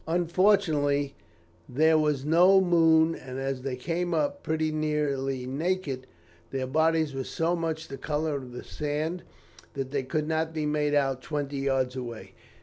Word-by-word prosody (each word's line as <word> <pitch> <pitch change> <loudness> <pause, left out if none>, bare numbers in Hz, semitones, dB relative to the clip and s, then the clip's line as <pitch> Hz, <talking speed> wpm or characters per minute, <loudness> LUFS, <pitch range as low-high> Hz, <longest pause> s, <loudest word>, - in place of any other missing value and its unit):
"Unfortunately, 165 -5 +2 0.6
there 160 +5 +4
was 150 -3 +1
no 180 +5 +6
moon, 165 -3 +4
and 130 -4 -8
as 135 -1 -3
they 130 -1 -3
came 170 +6 -2
up 285 -1 0
pretty 155 0 -1
nearly 140 -4 -1
naked, 140 -1 -2 0.4
their 135 -1 -2
bodies 160 +2 +2
were 135 0 -3
so 165 +6 -1
much 165 -2 -3
the 135 - -7
colour 150 +1 -1
of 130 -2 -8
the 120 - -8
sand 155 +4 -3 0.5
that 135 -1 -4
they 140 -1 0
could 150 +4 -2
not 160 0 -1
be 155 -1 -1
made 150 -1 +1
out 135 -2 +1
twenty 145 -2 -3
yards 135 -2 0
away. 120 -3 -7
150 Hz, 155 wpm, -27 LUFS, 135-160 Hz, 0.6 s, no